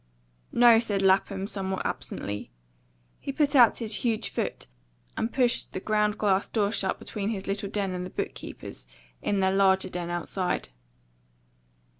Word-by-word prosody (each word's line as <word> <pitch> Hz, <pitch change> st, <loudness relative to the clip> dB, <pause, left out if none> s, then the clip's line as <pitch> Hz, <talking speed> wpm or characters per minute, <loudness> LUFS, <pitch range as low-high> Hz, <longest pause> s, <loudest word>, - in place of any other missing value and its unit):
"No," 235 Hz, -1 st, +7 dB
said 205 Hz, -4 st, 0 dB
Lapham, 195 Hz, 0 st, +2 dB
somewhat 190 Hz, -2 st, -3 dB
absently. 100 Hz, +1 st, -4 dB, 0.7 s
He 275 Hz, -, -4 dB
put 290 Hz, 0 st, +1 dB
out 240 Hz, -5 st, +7 dB
his 220 Hz, -3 st, +2 dB
huge 230 Hz, -3 st, 0 dB
foot -, -, -3 dB, 0.5 s
and 225 Hz, -, -1 dB
pushed 250 Hz, -2 st, +1 dB
the -, -, -3 dB
ground 210 Hz, +1 st, +1 dB
glass 200 Hz, -2 st, +1 dB
door 205 Hz, -3 st, +1 dB
shut 195 Hz, -3 st, -1 dB
between 205 Hz, -1 st, -4 dB
his 200 Hz, -4 st, -3 dB
little 195 Hz, 0 st, -3 dB
den 200 Hz, -2 st, -1 dB
and 180 Hz, 0 st, -3 dB
the 180 Hz, -, -6 dB
book -, -, -3 dB
keepers, -, -, -9 dB, 0.3 s
in 200 Hz, -1 st, 0 dB
their 190 Hz, 0 st, +2 dB
larger 190 Hz, -1 st, +3 dB
den 175 Hz, -1 st, -4 dB
outside. 180 Hz, -, -2 dB
200 Hz, 155 wpm, -27 LUFS, 190-220 Hz, 0.7 s, No